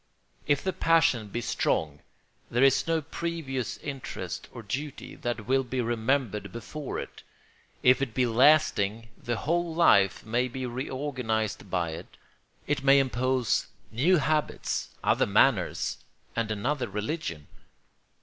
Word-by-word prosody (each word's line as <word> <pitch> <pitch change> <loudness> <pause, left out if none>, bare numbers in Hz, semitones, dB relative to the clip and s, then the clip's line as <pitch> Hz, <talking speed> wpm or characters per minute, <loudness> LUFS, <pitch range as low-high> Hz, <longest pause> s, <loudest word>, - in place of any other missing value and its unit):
If 145 -1 +2
the 190 - -1
passion 155 -11 +3
be 120 +4 -4
strong 80 -10 -1 0.5
there 120 +3 +2
is 135 +2 +4
no 165 -1 +1
previous 155 -6 -4
interest 135 -3 -6
or 120 - -9
duty 135 +8 -5
that 120 -3 -3
will 135 +1 +2
be 130 +1 -3
remembered 115 -3 0
before 130 +5 -6
it; - - -7 0.6
if 125 +1 +5
it 125 -5 -2
be 130 - +3
lasting 115 -4 +3
the 120 - -3
whole 170 +3 -1
life 100 - +4
may 120 +3 +1
be 130 +1 -5
reorganised 125 -5 -3
by 85 -3 -1
it; 80 - -9 0.5
it 145 -1 -1
may 135 0 +6
impose 130 -2 +1 0.2
new 155 +11 +3
habits, 150 +1 -1
other - - +3
manners, - - +2 0.4
and 115 -1 -1
another 120 +4 -1
religion. 105 - -4
125 Hz, 130 wpm, -28 LUFS, 110-145 Hz, 0.6 s, may